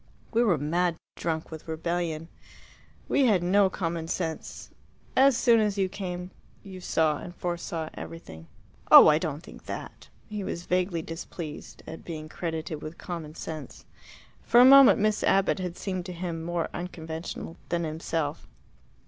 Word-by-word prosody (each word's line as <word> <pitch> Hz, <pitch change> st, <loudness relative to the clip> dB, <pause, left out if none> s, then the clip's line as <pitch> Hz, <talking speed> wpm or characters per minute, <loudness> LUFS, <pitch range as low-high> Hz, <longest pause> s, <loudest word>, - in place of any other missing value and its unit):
"We 235 Hz, +1 st, +4 dB
were 190 Hz, -9 st, +3 dB
mad 170 Hz, +4 st, 0 dB, 0.2 s
drunk 160 Hz, -1 st, -3 dB
with 160 Hz, 0 st, -9 dB
rebellion. 165 Hz, 0 st, -2 dB, 0.8 s
We 275 Hz, -, +3 dB
had 200 Hz, -7 st, +3 dB
no 195 Hz, +2 st, +4 dB
common 165 Hz, -3 st, -3 dB
sense. 165 Hz, -1 st, -4 dB, 0.4 s
As 265 Hz, -2 st, +5 dB
soon 235 Hz, -3 st, +5 dB
as 210 Hz, -2 st, +1 dB
you 190 Hz, -1 st, +1 dB
came, 180 Hz, -2 st, -5 dB, 0.3 s
you 190 Hz, -2 st, -9 dB
saw 155 Hz, -4 st, +1 dB
and 175 Hz, -, -9 dB
foresaw 170 Hz, -2 st, -3 dB
everything." 80 Hz, -, -9 dB, 0.4 s
"Oh, -, -, +11 dB
I 150 Hz, 0 st, +4 dB
don't 155 Hz, -1 st, -4 dB
think -, -, -13 dB
that." -, -, -7 dB, 0.2 s
He 210 Hz, -2 st, -5 dB
was 175 Hz, -1 st, -5 dB
vaguely 180 Hz, -2 st, 0 dB
displeased 165 Hz, -1 st, -8 dB
at 160 Hz, +1 st, -9 dB
being 155 Hz, -2 st, -7 dB
credited 160 Hz, -3 st, -4 dB
with 155 Hz, +2 st, -8 dB
common 165 Hz, -4 st, -6 dB
sense. 155 Hz, -5 st, -8 dB, 0.6 s
For 235 Hz, -, +4 dB
a 250 Hz, -, +9 dB
moment 275 Hz, 0 st, +9 dB
Miss 215 Hz, -1 st, +1 dB
Abbott 195 Hz, 0 st, +3 dB
had 180 Hz, -1 st, -4 dB
seemed 185 Hz, -2 st, -4 dB
to 180 Hz, -, -5 dB
him 170 Hz, -2 st, -4 dB
more 170 Hz, 0 st, -2 dB
unconventional 165 Hz, -1 st, -6 dB
than 170 Hz, 0 st, 0 dB
himself. 160 Hz, -1 st, -3 dB
170 Hz, 155 wpm, -27 LUFS, 160-185 Hz, 0.8 s, Oh